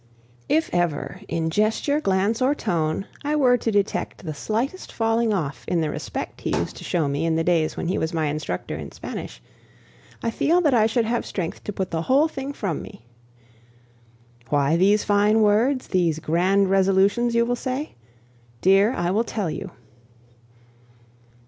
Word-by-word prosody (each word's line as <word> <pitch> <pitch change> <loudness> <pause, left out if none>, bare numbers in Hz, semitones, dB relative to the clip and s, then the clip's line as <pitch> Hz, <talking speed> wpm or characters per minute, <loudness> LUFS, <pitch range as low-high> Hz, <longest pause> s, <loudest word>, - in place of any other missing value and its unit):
If 320 +1 +1
ever, 175 -4 -1
in 165 -1 -1
gesture, 220 - +1
glance, 200 +2 +1
or 270 +3 +3
tone, 170 - -1 0.2
I 295 +1 0
were 255 -4 +4
to 230 - -2
detect 200 -2 -1
the 155 - -3
slightest 235 - -3
falling 225 0 +1
off 155 -9 -2
in 175 - +1
the 155 -2 -1
respect - - -6
he - - -1
used - - -3
to - - -9
show 165 -4 0
me 140 +3 -1
in 165 -1 +1
the 165 - +1
days 165 -2 +1
when - - -3
he 185 - 0
was 160 - -1
my 160 -2 0
instructor 150 +1 -3
in - - -7
Spanish, - - -8 0.8
I 230 - 0
feel 325 +9 +2
that 300 -6 +3
I 220 -3 +4
should 225 +1 +1
have 235 +1 0
strength 175 -4 -5
to - - -3
put 190 -2 -4
the 165 -1 -1
whole 275 - +3
thing 275 -2 -5
from 195 - -3
me. 115 - -12 1.4
"Why 145 +1 +2
these 200 +4 +3
fine 210 +2 +3
words, 235 +6 +2
these 170 -4 +1
grand 185 +5 +2
resolutions?" 195 +5 +3
you 235 0 +4
will 245 +1 0
say. 260 +4 -4 0.7
Dear, 195 +5 +4
I 175 -4 -1
will 215 +4 +2
tell 210 -7 -3
you. 190 +5 -6
200 Hz, 175 wpm, -23 LUFS, 170-235 Hz, 1.4 s, were